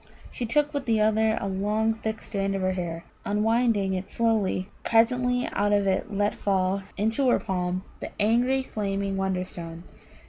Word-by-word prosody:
She 240 - -4
took 295 +5 +1
with 280 -3 -3
the 225 -2 +3
other 220 +1 +3
a - - -3
long 210 +3 +1
thick 220 0 -4
strand 195 -2 -2
of 195 - -2
her 185 - +2
hair, 170 -2 -4 0.2
and, 205 - -1
unwinding 220 -3 +2
it 185 0 -4
slowly, 215 -5 +1 0.2
presently 245 +2 +2
out 205 +1 +2
of 205 -1 +3
it 190 +1 0
let 205 +1 +1
fall 190 -1 0 0.2
into 225 +6 +2
her - - +5
palm 180 0 -2 0.2
the - - -5
angry 245 +5 +3
flaming 200 -4 -2
Wonderstone. 180 -3 -3
205 Hz, 170 wpm, -26 LUFS, 190-225 Hz, 0.2 s, her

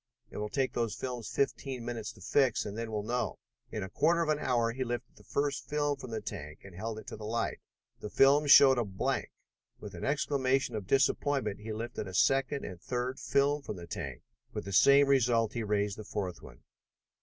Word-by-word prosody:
It - - -8
will 105 0 -3
take 135 +3 0
those 115 -3 -1
films 125 -4 -5
fifteen 130 0 -2
minutes 115 -3 -4
to - - -17
fix, 130 +5 +2
and 105 -1 -5
then 115 0 -4
we'll 105 -1 -2
know." 120 +3 -2 0.3
In 110 - -3
a 95 - -6
quarter 170 +2 +3
of 160 - -3
an 150 -1 +2
hour 120 -4 +1
he 130 +2 -3
lifted 120 0 -5
the - - -18
first 140 -1 -2
film 145 -1 +1
from 130 -2 -9
the 110 -1 -3
tank 75 -7 -7
and 95 - -12
held 110 +4 -5
it 110 - -9
to - - -7
the 105 - -10
light. 115 +1 -1 0.4
The 105 - -6
film 140 +5 +5
showed 135 -2 +8
a - - +2
blank. 95 -3 -2 0.5
With - - -9
an - - -8
exclamation 135 -3 +1
of 100 -4 -5
disappointment 135 -4 +1
he 110 +1 -6
lifted 115 -1 -4
a 95 - -7
second 135 +5 +2
and 90 -2 -8
third 125 +1 -3
film 145 +1 +2
from 125 - -6
the 85 -2 -8
tank, 70 -6 -6 0.3
with - - -4
the 100 - -5
same 140 +7 +7
result 120 -5 +3
He 120 - -2
raised 105 -1 -1
the - - -6
fourth 100 -4 -4
one. - - -14
120 Hz, 215 wpm, -31 LUFS, 105-135 Hz, 0.5 s, showed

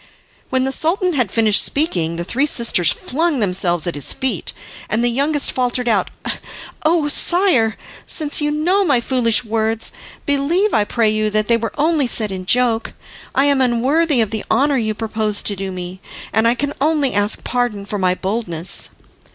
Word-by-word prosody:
When 260 0 +1
the 265 - -1
Sultan 355 +6 +1
had 250 -8 0
finished 215 0 +3
speaking 175 - 0
the 170 - -4
three 265 +11 0
sisters 230 - +3
flung 315 +1 -1
themselves 180 -5 +1
at 175 - -2
his 145 -2 -1
feet, 260 -1 -1 0.4
and 225 +2 0
the 240 - +2
youngest 280 +4 +1
faltered 250 -1 -1
out, 210 -5 +1 0.7
"Oh, 315 -1 +2
sire, 295 - +2 0.3
since 300 -1 0
you 295 - 0
know 345 +7 +1
my 280 -9 +2
foolish 235 -2 +1
words, 225 0 -1 0.3
believe, 315 +9 +1
I 210 - +2
pray 220 0 +1
you, 215 0 0
that 215 0 0
they 235 - +3
were 230 0 -4
only 305 -2 +1
said 215 -3 +1
in 185 -1 -6
joke. 240 -1 +1 0.4
I 275 - +3
am 280 -2 +2
unworthy 260 +4 +2
of 220 - -1
the 220 -1 -4
honour 275 +5 +2
you 215 -3 -1
propose 215 -1 -1
to 205 - +1
do 195 0 -5
me, 180 +1 -7 0.3
and 220 +1 +3
I 235 - +3
can 285 +2 -2
only 295 -2 +1
ask 205 +1 +1
pardon 240 -5 -2
for 205 0 -4
my 185 -1 +1
boldness." 185 -4 -1
235 Hz, 180 wpm, -18 LUFS, 210-285 Hz, 0.7 s, finished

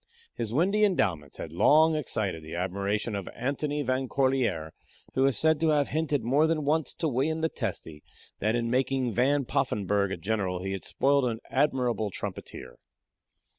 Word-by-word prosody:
His 115 -2 -4
windy 190 - +2
endowments 90 - 0
had 80 - -6
long 155 - +5
excited 110 - -2
the 80 +2 -8
admiration 100 +5 -2
of 100 -2 -5
Antony 145 +4 -2
Van 130 0 -1
Corlear, 130 - 0 0.4
who 135 +1 +3
is 135 - 0
said 160 -1 +3
to 165 - +2
have 145 -2 +2
hinted 150 -2 0
more 140 +6 +3
than 155 -2 0
once 155 -1 0
to 165 - -1
William 150 +4 0
the 160 - +1
Testy 90 - -5 0.4
that 110 +3 +1
in 115 -1 -1
making 130 -1 0
Van 135 +4 +2
Poffenburgh 100 -3 0
a - - -2
general 95 -1 -2
he 95 - -3
had 95 -1 -4
spoiled 140 0 +2
an 115 -2 -2
admirable 125 -6 +1
trumpeter. 65 -8 -7
125 Hz, 170 wpm, -28 LUFS, 100-145 Hz, 0.4 s, long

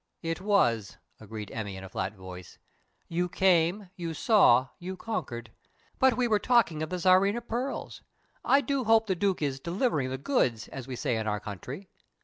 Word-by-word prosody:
"It 165 +2 -3
was," 120 - +1 0.2
agreed 110 -1 -8
Emmy, 105 -4 -5
in 95 - -9
a 95 - -9
flat 95 +2 -3
voice. 90 -2 -10 0.5
"You 175 +1 -1
came, 180 +1 +2
you 165 -2 -5
saw, 135 - +5
you 185 +1 -6
conquered. 120 - -5 0.5
But 260 -3 +4
we 250 -1 +2
were 215 -2 +3
talking 230 -12 +2
of 155 - -3
the 180 - -2
Tsarina 190 +5 +4
pearls. 250 +4 -4 0.4
I 275 - +4
do 275 -1 -1
hope 225 0 +5
the 195 - 0
Duke 190 -2 0
is 135 -2 -1
'delivering 170 - 0
the 130 - -3
goods', 130 - 0
as 135 -2 -8
we 130 - -5
say 120 -1 -1
in 110 0 -3
our 105 -1 0
country. 125 - -8
170 Hz, 180 wpm, -28 LUFS, -, 0.5 s, saw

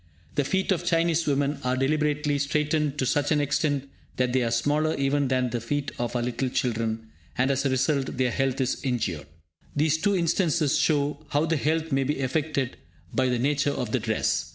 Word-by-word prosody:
The 145 - +1
feet 190 +8 0
of 180 -2 +1
Chinese 170 -1 +1
women 145 0 +1
are 125 0 0
deliberately 150 +1 +1
straitened 150 +1 0
to 130 - 0
such 145 +3 +1
an 150 - +3
extent 145 -1 0 0.3
that 125 -1 +1
they 130 - +3
are 120 - +1
smaller 145 +7 +1
even 140 0 +1
than 130 -1 +1
the 120 -1 -2
feet 140 +4 -2
of 120 0 -2
our 120 - 0
little 125 +2 -1
children, 115 -3 -2 0.3
and, 130 +2 +2
as 135 +1 +1
a - - 0
result, 135 +1 0
their 130 -1 +2
health 135 +2 0
is 130 0 0
injured. 105 - -2 0.5
These 155 +1 +2
two 200 +3 +2
instances 170 -3 +2
show 145 -1 +1
how 145 +2 +2
the 165 0 +1
health 160 +2 0
may 135 0 +2
be 140 +1 -1
affected 140 -1 -1 0.4
by 130 -1 +2
the 125 - +1
nature 145 +3 +1
of 125 -5 -3
the - - +1
dress. - - 0
140 Hz, 200 wpm, -26 LUFS, 130-150 Hz, 0.5 s, an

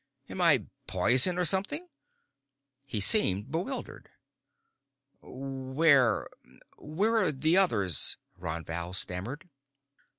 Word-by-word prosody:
"Am - - -5
I - - +4 0.2
poison, 130 +9 +2
or 180 - +1
something?" 200 - -1 1.0
He 115 -6 -2
seemed 105 - +4
bewildered. 185 - -6 1.1
"Where 135 -1 0 0.5
where 200 +10 -1
are 185 -8 +1
the 155 +5 +1
others?" 100 - +2 0.2
Ron 85 -3 -6
Val 85 +2 -6
stammered. 105 - -3
135 Hz, 95 wpm, -28 LUFS, -, 1.1 s, I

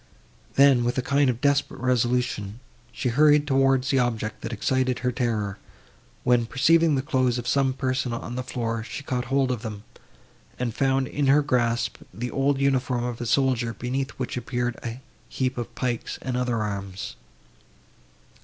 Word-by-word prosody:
Then, 135 -3 +6
with 120 +2 -1
a 130 - +1
kind 140 0 +3
of 120 0 -2
desperate 140 -1 +1
resolution, 125 -4 0 0.3
she 125 - -2
hurried 150 +3 +5
towards 135 -1 +2
the 135 - +3
object 115 -3 -1
that - - -5
excited 130 +3 0
her 125 - +2
terror, 110 -5 -2 0.6
when, 120 -2 +3
perceiving 160 +4 +4
the 130 - 0
clothes 130 -4 +1
of 120 0 -5
some 135 0 +2
person, 130 -1 -1
on 115 +1 -5
the 130 - -2
floor, 115 -3 -3
she 130 - -7
caught 125 -3 -2
hold 135 +1 +1
of 120 -4 -3
them, 105 -3 -6 0.7
and 120 -3 -2
found 135 0 +1
in 145 +1 -1
her 145 +2 +5
grasp 120 -3 0
the 120 +2 -5
old 135 0 +1
uniform 130 -3 +1
of 120 -1 -4
a 120 - -3
soldier, 125 -3 +1
beneath 130 +3 -2
which 130 -1 -3
appeared 120 0 -2
a 120 +2 -5 0.3
heap 130 0 -1
of 120 -1 -6
pikes 120 -2 -2
and 130 -1 -2
other 120 -3 0
arms. 100 -2 -5
125 Hz, 170 wpm, -25 LUFS, 120-135 Hz, 0.7 s, Then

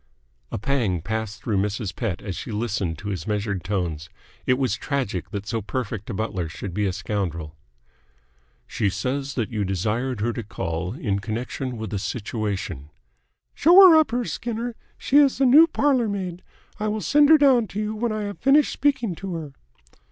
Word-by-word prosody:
A - - -2
pang 110 - 0
passed 110 -1 -3
through 110 -4 0
Mrs. 105 0 -3
Pett 105 -8 -3
as 100 -3 -4
she 115 - -6
listened 105 -6 -2
to 100 +5 -6
his 90 -6 -4
measured 105 -3 -2
tones. 85 -5 -3 0.4
It 125 - +4
was 130 -1 0
tragic 110 - -3
that 100 -1 -5
so 115 +1 -2
perfect 110 -1 -4
a - - -3
butler 95 -6 -2
should 90 +2 -7
be 105 +2 0
a - - 0
scoundrel. 90 -5 -3 1.1
"She 100 - -1
says 135 +7 -3
that 115 -6 -2
you 105 -2 -1
desired 105 +6 -1
her 120 +2 0
to 120 - -4
call 90 -3 -4
in 105 - -2
connection 120 +4 -4
with 110 -2 -5
a 100 - -1
situation." 100 - -4 0.6
"Show 335 +4 +5
her 375 -3 +10
up 315 -4 +5
here, 240 +1 -1
Skinner. 235 +1 -4 0.2
She 280 - +2
is 285 -3 +5
the 270 - +3
new 295 +6 +8
parlour 270 -7 +2
maid. 185 -3 -4 0.4
I 215 - -1
will 215 0 -1
send 295 +4 +4
her 315 - +9
down 260 -6 +4
to 195 - -5
you 215 0 -2
when 230 +1 -1
I 215 -1 -2
have 205 -1 -5
finished 285 +2 +4
speaking 265 -8 +1
to 195 -3 -5
her." 155 -4 -6
115 Hz, 190 wpm, -24 LUFS, -, 1.1 s, her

